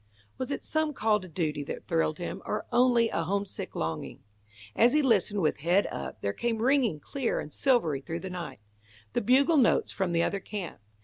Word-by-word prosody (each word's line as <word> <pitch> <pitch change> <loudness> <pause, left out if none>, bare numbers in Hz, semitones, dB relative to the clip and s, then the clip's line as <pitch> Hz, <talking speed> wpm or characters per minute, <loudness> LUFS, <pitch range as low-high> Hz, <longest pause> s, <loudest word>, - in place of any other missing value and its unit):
Was 255 - -3
it 280 - -3
some 315 -1 0
call 215 -3 +2
to 185 - -10
duty 155 -4 -2
that - - -6
thrilled 165 -2 +1
him, 180 +2 -5
or 210 - -3
only 240 -2 +4
a - - -1
homesick 200 +4 -3
longing? 80 0 -4 0.5
As 240 +2 +5
he 300 0 +3
listened 210 -5 +2
with 155 - +1
head 175 +7 +2
up, 70 - -6
there 100 - -1
came 235 - -1
ringing, 250 - +2
clear 265 - -2
and 150 - -7
silvery 220 - +2
through 165 +4 -5
the 190 - -5
night, 175 - -6 0.5
the - - +1
bugle 275 +8 +4
notes 250 -5 +3
from 190 -3 -1
the 170 0 +2
other 200 - -1
camp. 195 - -6
200 Hz, 195 wpm, -28 LUFS, 165-245 Hz, 0.5 s, As